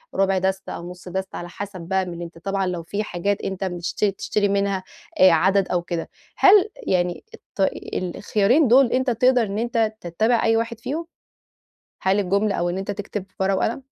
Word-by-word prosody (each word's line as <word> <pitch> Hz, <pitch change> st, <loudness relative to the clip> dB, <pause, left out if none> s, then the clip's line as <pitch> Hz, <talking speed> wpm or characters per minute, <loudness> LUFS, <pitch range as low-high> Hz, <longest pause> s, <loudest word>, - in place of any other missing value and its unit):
ربع 195 Hz, -1 st, +2 dB
دستة 190 Hz, +1 st, -1 dB
أو 170 Hz, +1 st, -7 dB
نُص 180 Hz, 0 st, -11 dB
دستة 190 Hz, +1 st, -4 dB
على 175 Hz, 0 st, -6 dB
حسب 195 Hz, -1 st, -7 dB
بقى 190 Hz, +2 st, 0 dB
من 175 Hz, -1 st, -7 dB
أنت 170 Hz, -1 st, -8 dB
طبعًا 195 Hz, +1 st, -2 dB
لو 175 Hz, -2 st, -3 dB
في 205 Hz, +5 st, -3 dB
حاجات 200 Hz, 0 st, -2 dB
أنت 190 Hz, 0 st, -4 dB
بتش 175 Hz, -2 st, -3 dB
تشتري 205 Hz, 0 st, 0 dB
منها 200 Hz, -1 st, 0 dB, 0.4 s
آآ، 185 Hz, -1 st, +8 dB
عدد 190 Hz, +4 st, +3 dB
أو 175 Hz, -1 st, +1 dB
كده، 170 Hz, -1 st, -4 dB, 0.3 s
هل 405 Hz, +1 st, +6 dB, 0.2 s
يعني 180 Hz, -1 st, 0 dB
الط -, -, -1 dB, 0.2 s
الخيارين 210 Hz, -, +2 dB
دول 250 Hz, +1 st, +5 dB
أنت 260 Hz, 0 st, +1 dB
تقدر 250 Hz, +1 st, +3 dB
إن 205 Hz, +1 st, -3 dB
أنت 230 Hz, -2 st, 0 dB
تتبع 215 Hz, +8 st, +1 dB
أي 225 Hz, 0 st, +3 dB
واحد 230 Hz, 0 st, -2 dB
فيهم؟ 320 Hz, +8 st, -4 dB, 1.0 s
هل 190 Hz, +2 st, +2 dB
الجملة 200 Hz, +2 st, +1 dB
أو 175 Hz, 0 st, 0 dB
إن 180 Hz, -, -3 dB
أنت 195 Hz, +1 st, -4 dB
تكتب 205 Hz, -1 st, -5 dB
في -, -, -37 dB
ورقه 190 Hz, 0 st, +2 dB
وقل؟ 235 Hz, +4 st, -1 dB
195 Hz, 190 wpm, -23 LUFS, 180-220 Hz, 1.0 s, آآ